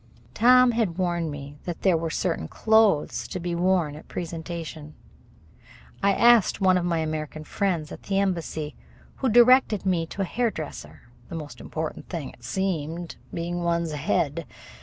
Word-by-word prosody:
Tom 250 - +6
had 220 -7 0
warned 175 -3 0
me 145 0 -8
that 175 -2 -5
there 190 -3 +4
were 165 0 -1
certain 80 - -1
clothes 220 - +2
to 185 - -5
be 175 0 -3
worn 175 -3 +1
at 155 - -9
a - - -26
presentation. 165 -2 -6 1.1
I 200 0 +4
asked 235 -2 +5
one 190 -2 +4
of 180 -1 +1
my 170 -1 +1
American 155 -1 -3
friends 170 -3 -1
at - - -8
the 195 - -2
embassy, 170 -6 -1 0.4
who 265 - 0
directed 240 -3 +5
me 175 -3 +1
to 195 - -3
a - - -1
hairdresser 160 - -4 0.3
the - - -6
most 150 -3 -7
important 160 0 -5
thing, 165 -6 -5
it 120 - -20
seemed, 170 +2 -3
being 175 +1 -3
one's 170 -1 0
head. 150 0 -1
170 Hz, 160 wpm, -25 LUFS, 155-195 Hz, 1.1 s, Tom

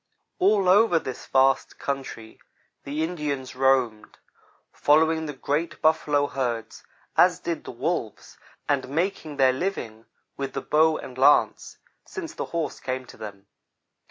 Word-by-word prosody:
All 195 0 +3
over 195 -1 +5
this 130 -5 -5
vast 135 0 +2
country 135 -5 -5 0.5
the 150 +3 -2
Indians 150 -7 -3
roamed, 130 -5 +1 0.6
following 160 +1 +3
the 150 - -5
great 145 +5 -2
buffalo 150 -2 +2
herds 120 -5 -4 0.3
as - - +5
did - - -4
the - - -6
wolves, - - -4 0.3
and 135 -3 0
making 160 -1 -2
their 130 -2 +4
living 125 - -4 0.3
with 135 -1 -4
the - - -3
bow 155 +1 +3
and 130 0 -9
lance, 140 +2 +3 0.3
since 345 -5 -7
the - - -4
horse 165 -3 -3
came 130 0 -4
to - - -14
them. 100 -2 -9
145 Hz, 135 wpm, -25 LUFS, 130-160 Hz, 0.6 s, over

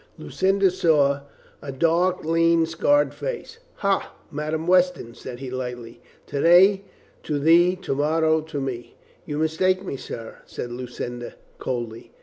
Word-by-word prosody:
Lucinda 195 0 +1
saw 145 -6 +2 0.4
a 140 - -6
dark, 170 +5 +1
lean, 165 0 +3
scarred 290 - +2
face. 465 -1 -6 0.2
"Ha, 200 -1 0 0.2
Madame 155 +1 -3
Weston," 180 -9 +2
says 120 +1 -9
he 130 -2 -6
lightly. 120 -2 -6 0.2
"To 140 - -3
day 190 +4 +6 0.4
to 150 - -2
thee, 170 +5 +5
to 170 - -1
morrow 155 +2 +2
to 155 -2 -6
me." 130 -3 -5 0.3
"You 145 - -3
mistake 185 +5 +1
me, 140 - -4
sir," 115 -3 -8
said 120 - -6
Lucinda 120 0 -6 0.2
coldly. 120 -3 -5
160 Hz, 135 wpm, -24 LUFS, 130-180 Hz, 0.4 s, day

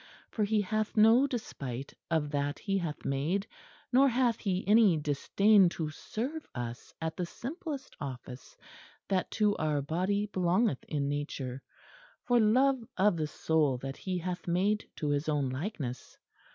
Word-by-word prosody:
For 215 - 0
he 210 0 +2
hath 215 +2 -2
no 225 +6 +6
despite 140 - -5 0.2
of 155 -3 0
that 145 -1 -1
He 195 -2 -1
hath 160 -4 -5
made, 155 +9 0 0.5
nor 270 +2 +6
hath 240 -2 +2
He 190 -2 -2
any 210 -5 +6
disdain 185 +7 +4
to 155 -2 -2
serve 270 - -5
us 120 0 -6
at 160 -1 -3
the 180 - -2
simplest 285 - -6
office 130 -2 -8 0.5
that 190 -2 +1
to 210 -1 +2
our 150 -2 0
body 185 +7 0
belongeth 185 - +1
in 145 -2 -1
nature, 140 -3 -3 0.6
for 245 -1 +3
love 255 +4 +4
of 195 0 +4
the 155 -2 -1
soul 150 -3 +1
that 135 +2 -6
He 185 -1 -3
hath 180 +1 -4
made 195 +5 +1
to 150 - -2
His 145 +2 0
own 145 -3 +1
likeness. 130 - -5
180 Hz, 150 wpm, -31 LUFS, 145-215 Hz, 0.6 s, no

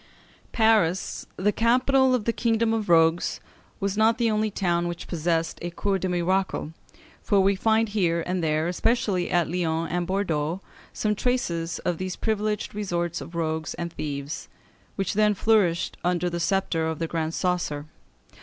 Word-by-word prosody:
Paris, 215 -6 +2
the 205 +3 +1
capital 255 +3 +3
of 225 -4 -2
the 230 - +1
kingdom 225 -1 +1
of 220 -4 -2
rogues, 165 0 +3 0.4
was 200 -1 -1
not 220 +2 +3
the 230 -2 +2
only 215 0 +1
town 175 -4 0
which 175 0 -6
possessed 165 -1 -1
a 175 - -3
Cour 195 +3 -1
des 185 - -1
Miracles, 180 -2 0 0.5
for 205 -3 +2
we 195 +1 +4
find 220 +2 +2
here 170 -5 +1
and 180 -1 -1
there, 155 +1 +1
especially 185 -1 0
at 175 -2 +2
Lyons 165 -1 -1
and 175 -1 -1
Bordeaux, 175 -4 -1 0.3
some 210 -1 0
traces 175 -8 -1
of 175 -2 0
these 185 -1 -3
privileged 215 -1 -1
resorts 175 -5 -2
of 170 - -9
rogues 160 -2 -2
and 170 -1 -5
thieves, 145 -1 -5 0.5
which 195 -2 -1
then 210 0 +3
flourished 195 -5 +2
under 180 0 0
the 170 - -2
sceptre 170 -2 0
of 160 -1 -2
the 165 - -2
Grand 160 -1 -2
Coesre. 175 -6 -1
180 Hz, 165 wpm, -25 LUFS, 165-210 Hz, 0.5 s, we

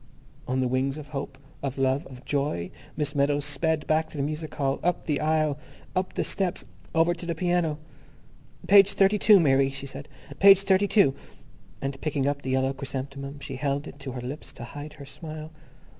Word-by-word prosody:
On 130 +1 0
the 130 - +1
wings 130 +3 0
of 150 -1 -9
hope, 140 -2 -5 0.2
of 140 -1 -3
love, 135 +4 +1
of 130 -1 -12
joy, 140 -12 -1 0.3
Miss 150 -1 -1
Meadows 145 0 +1
sped 160 +1 0
back 155 0 +1
to - - -10
the 140 - 0
music 155 +1 -4
hall, 135 -1 0
up 175 +1 0
the 150 -3 0
aisle, 155 -2 +1 0.4
up 185 0 -1
the - - +1
steps, 190 -3 -1 0.3
over 165 +2 +4
to 175 - -9
the 170 -1 -2
piano. 175 -4 +1 0.9
"Page 200 0 +7
thirty 200 +1 +3
two, 210 -1 +7
Mary," 135 -4 +4
she 140 0 -6
said, 140 +1 -8 0.3
"page 195 0 +8
thirty 195 0 +3
two," 200 -10 +4 0.7
and, 135 0 -3
picking 145 -3 -1
up 140 0 0
the 130 - -5
yellow 130 +1 +1
chrysanthemum, 140 +1 -6
she 135 -2 -6
held 140 +1 -1
it 145 - -11
to 135 -2 -6
her 125 - -5
lips 130 +5 -6
to - - -9
hide 145 +5 -8
her 140 - -11
smile. 155 +2 -8
145 Hz, 195 wpm, -26 LUFS, 135-160 Hz, 0.9 s, page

